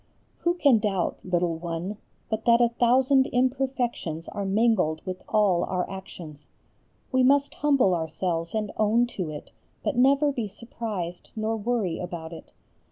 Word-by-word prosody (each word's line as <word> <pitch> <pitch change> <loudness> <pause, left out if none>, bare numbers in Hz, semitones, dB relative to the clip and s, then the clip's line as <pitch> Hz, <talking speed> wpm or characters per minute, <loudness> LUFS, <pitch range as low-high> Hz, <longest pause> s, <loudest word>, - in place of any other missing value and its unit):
Who 345 0 +1
can 280 -9 +4
doubt, 195 -4 -1
little 175 -2 0
one, 175 +4 -4 0.3
but 220 0 -3
that 235 0 +5
a 240 -1 +4
thousand 260 +3 +3
imperfections 250 - -1
are 200 - -4
mingled 195 -6 +1
with 185 -1 -5
all 200 -5 +3
our 180 -1 -2
actions. 175 -6 -9 0.6
We 260 - +3
must 280 +2 +3
humble 275 -10 +3
ourselves 165 +1 -2
and 210 -1 -1
own 220 +3 +3
to 180 -5 -2
it, 150 -1 -8 0.3
but - - -1
never 275 +4 +4
be 235 -6 -3
surprised 205 -5 -6
nor 220 0 -1
worry 220 -5 -1
about 170 -2 -6
it. 165 - -11
210 Hz, 150 wpm, -26 LUFS, 175-245 Hz, 0.6 s, that